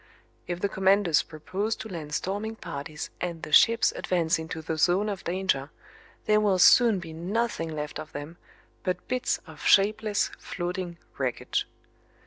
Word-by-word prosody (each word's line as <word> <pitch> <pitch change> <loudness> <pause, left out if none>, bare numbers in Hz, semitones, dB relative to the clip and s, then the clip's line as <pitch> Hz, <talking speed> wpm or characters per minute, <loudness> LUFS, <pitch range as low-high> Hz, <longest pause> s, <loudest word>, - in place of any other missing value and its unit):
If 175 -1 -3
the - - +2
commanders 190 -3 +3
propose 190 +8 -3
to - - -7
land 155 -6 -5
storming 205 +4 -3
parties 155 -5 -6
and 170 -2 -4
the - - -6
ships 230 +8 +6
advance 165 -3 0
into 160 0 -6
the 160 - -2
zone 180 +6 +2
of 200 -3 -5
danger 175 -6 -1 0.6
there 215 0 +4
will 205 -3 +2
soon 225 +3 +6
be 165 -3 -7
nothing 180 +1 -2
left 150 -1 -5
of 155 - -8
them 145 +4 -7 0.4
but 180 -1 -3
bits 255 0 0
of - - -13
shapeless 210 +1 +3
floating 175 -1 -4 0.2
wreckage. 130 -3 -1
180 Hz, 150 wpm, -27 LUFS, 160-205 Hz, 0.6 s, ships